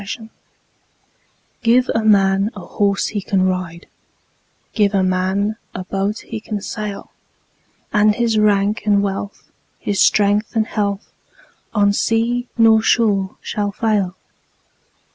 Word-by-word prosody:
Gifts 200 +4 -6 1.4
GIVE 245 +2 +3
a 225 - 0
man 195 -1 +3
a 200 - -8
horse 200 -1 0
he 205 - -3
can 190 0 0
ride, 185 -2 -3 0.9
Give 205 -2 +2
a 190 - +2
man 190 +3 0 0.2
a 185 - -4
boat 195 +3 -2
he 225 - -5
can 210 -1 -5
sail; 210 0 -6 0.8
And 210 0 +4
his 230 -2 +1
rank 205 0 +2
and 200 -1 +3
wealth, 200 0 -5 0.3
his 200 -1 -1
strength 205 +2 +2
and 220 -1 +2
health, 200 -2 -3 0.6
On 205 -1 +3
sea 235 +3 0
nor 225 -1 +5
shore 205 -4 +1
shall 205 -1 -2
fail. 205 -4 -1
205 Hz, 125 wpm, -19 LUFS, 195-220 Hz, 1.4 s, nor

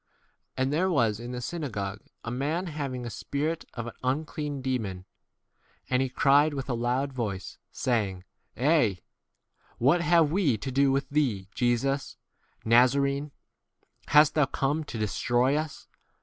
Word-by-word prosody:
33 130 - +2
And 135 +2 0
there 180 +5 +2
was 115 - +2
in 120 +1 -6
the 125 0 -4
synagogue 110 - -4 0.2
a 115 - -4
man 150 +8 -1
having 140 -7 -4
a 120 - -5
spirit 155 +9 -3
of 120 - -4
an 120 - -7
un 135 +5 0
clean 150 -3 -4
demon, 110 -9 -3 0.9
and 125 0 +3
he 135 - 0
cried 145 +4 +4
with 135 -1 -3
a - - -14
34 120 - 0
loud 130 +3 0
voice, 105 -7 -4
saying, 100 -7 -1 0.3
Eh! 140 -5 +3
J - - -23 0.8
what 140 +9 +3
have 170 -3 +4
we 160 - +2
to 130 +6 -5
do 135 +1 +3
with 135 +1 0
thee, 120 -10 0
Jesus, 130 +3 0 0.5
Naza 125 +4 +5
rene? 140 +1 -1 0.8
hast 150 0 +6
thou 150 -3 +3
come 145 +3 -1
to 120 - -6
destroy 120 +5 +1
us 155 0 -4
135 Hz, 165 wpm, -28 LUFS, 120-150 Hz, 0.9 s, hast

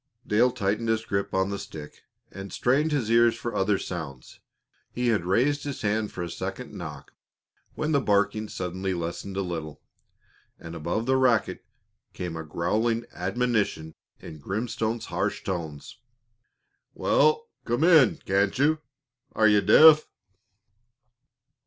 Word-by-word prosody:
Dale 115 +4 +3
tightened 115 -1 -2
his 110 0 0
grip 100 -2 -2
on 95 +1 0
the 100 - -3
stick 75 -2 -10 0.3
and 95 0 -8
strained 145 +6 +1
his 125 -7 -1
ears 115 0 +5
for 120 - -5
other 100 +1 +1
sounds. 80 -10 -7 0.5
He 125 0 -1
had 105 -7 +1
raised 135 +10 +1
his 140 -5 -5
hand 105 0 0
for 90 - -5
a 85 - -5
second - - -6
knock - - -8 0.6
when 155 +1 -2
the 140 -3 +3
barking 105 0 +1
suddenly 95 +1 -3
lessened 85 +3 -5
a 100 - 0
little, 80 -4 -6 0.8
and 80 - -9
above 85 +8 -2
the 130 +1 +2
racket 125 -4 +1 0.5
came 90 -2 -5
a 80 - -5
growling 110 +9 -1
admonition 100 -4 -1 0.3
in 80 - -10
Grimstone's 110 - -3
harsh - - -2
tones: 80 -6 -6 1.0
"Wal, 460 0 +2 0.2
come 120 +5 -1
in, 160 -9 +6
can't 100 +1 +1
you? 155 +3 +2 0.5
Are 110 -1 +4
you 105 -1 +4
deaf?" 155 +10 +7
105 Hz, 140 wpm, -26 LUFS, 90-120 Hz, 1.0 s, deaf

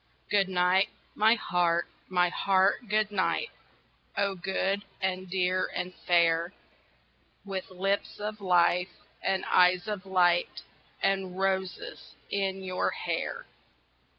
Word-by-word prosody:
GOOD 195 -2 +3
NIGHT, 180 +1 +3 0.2
my 220 +2 +4
Heart, 175 -5 +1 0.2
my 180 -1 +3
Heart, 195 +5 +2
good 215 0 +1
night 205 - 0 0.7
Oh, 200 0 +1
good 190 +2 -1 0.2
and 185 -1 -2
dear 185 0 +1
and 180 0 -3
fair, 170 0 +2 0.9
With 190 -2 -5
lips 195 +3 -2
of 210 0 -5
life 180 -1 +2 0.3
and 190 0 0
eyes 180 +1 +4
of 200 -3 -4
light 175 -2 +2 0.4
And 190 -2 0
roses 190 -2 -3 0.2
in 195 -1 -1
your 185 -1 -1
hair. - - -3
190 Hz, 115 wpm, -29 LUFS, 180-195 Hz, 0.9 s, my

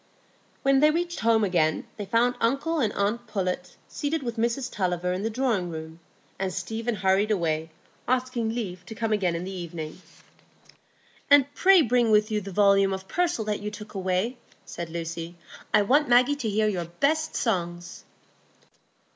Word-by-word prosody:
When 275 0 +4
they 300 +2 +6
reached 345 +2 -1
home 225 -1 +3
again, 170 -5 +1
they 205 - -5
found 235 +4 +2
uncle 275 +8 +1
and 220 -7 +1
aunt 205 +4 -1
Pullet 180 -2 -3
seated 295 0 -3
with 235 -2 -3
Mrs 235 +3 -1
Tulliver 180 -2 -1
in 185 - -3
the 220 - -1
drawing 225 -7 0
room, 160 0 -8 0.4
and 190 -1 -1
Stephen 220 +6 -3
hurried 190 +2 +2
away, 165 -5 0 0.4
asking 250 -2 0
leave 195 -6 -4
to 220 - -8
come 225 0 -1
again 185 -5 +1
in 170 - -3
the 190 - -5
evening. 170 -3 -6 1.3
"And 285 0 +5
pray 375 +1 +6
bring 240 -1 +2
with 215 +1 +3
you 210 -1 0
the 195 0 -8
volume 195 0 +4
of 190 0 -6
Purcell 345 - 0
that 210 -1 -2
you 210 - -3
took 210 0 -10
away," 190 +5 -1 0.3
said 170 -1 -6
Lucy. 170 +1 -5 0.4
"I 210 - +4
want 285 +7 +3
Maggie 250 +4 +5
to 240 -6 -2
hear 215 +1 +1
your 180 -5 -1
best 285 - 0
songs." 175 -5 -2
210 Hz, 170 wpm, -26 LUFS, 180-245 Hz, 1.3 s, they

